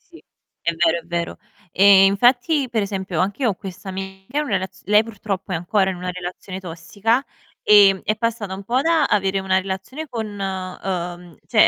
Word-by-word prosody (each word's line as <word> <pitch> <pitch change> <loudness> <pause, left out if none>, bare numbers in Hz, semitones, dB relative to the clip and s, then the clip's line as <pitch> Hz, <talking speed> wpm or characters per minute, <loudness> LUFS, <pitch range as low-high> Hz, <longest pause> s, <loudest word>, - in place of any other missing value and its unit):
Sì. - - -15 0.4
È 170 +2 0
vero, 170 0 +2
è - - -15
vero. 170 0 -3 0.3
Ehm, 195 0 +7
infatti, 245 +7 +3
per 225 -3 0
esempio, 190 -4 -3
anche 200 +8 -1
io 235 - +4
ho - - 0
questa 190 0 -9
amica 190 +6 -7
in - - 0
una 225 - -3
relaz 190 +1 -3
lei 210 +2 +5
purtroppo 200 -3 -5
è - - 0
ancora 190 +3 +1
in 180 - -7
una 180 +1 -4
relazione 180 +1 -6
tossica, 195 +8 -1 0.4
ehm, 200 -2 +6
è 215 - 0
passata 220 -4 -2
un 195 - -9
po' 245 +5 +1
da 325 -1 +3
avere 195 -5 +1
una 190 0 +1
relazione 195 +11 -5
con 230 -5 -4
uhm, 185 -3 -5
cioè - - +5
195 Hz, 190 wpm, -21 LUFS, 185-215 Hz, 0.4 s, Ehm